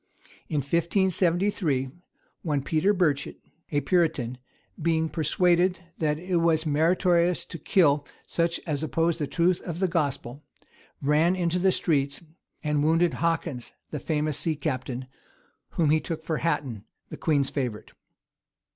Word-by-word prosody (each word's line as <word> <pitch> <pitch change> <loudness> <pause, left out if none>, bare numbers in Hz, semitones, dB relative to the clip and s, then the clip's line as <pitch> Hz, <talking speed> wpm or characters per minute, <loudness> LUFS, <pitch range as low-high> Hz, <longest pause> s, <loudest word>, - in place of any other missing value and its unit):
In 150 -2 0
1573, 170 - +1 0.5
one 145 -5 -1
Peter 160 +7 +2
Burchet, 170 -8 0 0.3
a 145 -1 +1
Puritan, 135 -6 +1 0.4
being 160 0 +1
persuaded 175 +3 +2 0.2
that 150 -2 +1
it 180 +2 -1
was 165 -1 +2
meritorious 170 +3 +2
to 165 - -8
kill 145 -7 +3 0.2
such 170 0 0
as 150 -4 -2
opposed 165 +1 0
the 150 - -1
truth 175 +3 +1
of 170 -2 -5
the 190 +1 +1
gospel, 145 -4 -2 0.6
ran 155 +5 +3
into 175 -1 0
the 190 +1 +4
streets, 140 -6 0 0.4
and 150 -1 +1
wounded 165 +3 +3
Hawkins, 165 -6 -2 0.2
the 150 - -3
famous 150 -1 -1
sea 160 -2 0
captain, 130 -4 -3 0.7
whom 155 -3 +2
he 155 - +4
took 160 +1 -5
for 160 - -1
Hatton, 135 -10 -2 0.3
the - - -7
queen's 145 -4 +1
favorite. 125 -7 -3
160 Hz, 135 wpm, -26 LUFS, 145-170 Hz, 0.7 s, the